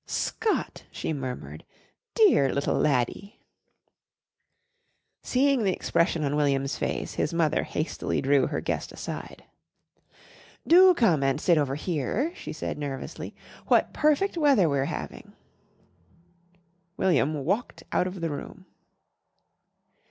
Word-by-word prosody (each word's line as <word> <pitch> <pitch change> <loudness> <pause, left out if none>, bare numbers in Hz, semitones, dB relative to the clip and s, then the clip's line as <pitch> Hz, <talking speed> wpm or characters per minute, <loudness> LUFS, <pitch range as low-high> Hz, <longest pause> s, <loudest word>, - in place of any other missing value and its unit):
"Scott!" 440 - -2
she - - -3
murmured. 130 -3 -6 0.5
"Dear 370 - +5
little 140 - 0
laddie!" 145 - -1 1.8
Seeing 270 -1 +2
the 190 -2 +2
expression 170 -2 0
on 145 0 0
William's 140 -2 +1
face - - -3
his 165 - -2
mother 160 -2 +2
hastily 155 - -3
drew 140 0 +3
her - - -3
guest - - -3
aside. - - -7 1.2
"Do 365 +2 +7
come 175 - +3
and 135 -1 +1
sit 170 -3 +3
over 135 -2 -1
here," 175 - -2
she - - -8
said - - -5
nervously. 140 -2 -6 0.3
"What - - +3
perfect 305 +6 +1
weather 275 - +4
we're 140 -2 0
having." - - -7 1.6
William 150 -5 +1
walked 200 +9 -2
out 180 - +2
of 185 -1 -7
the 165 -2 -1
room. 185 +6 -8
160 Hz, 115 wpm, -26 LUFS, 140-230 Hz, 1.8 s, Do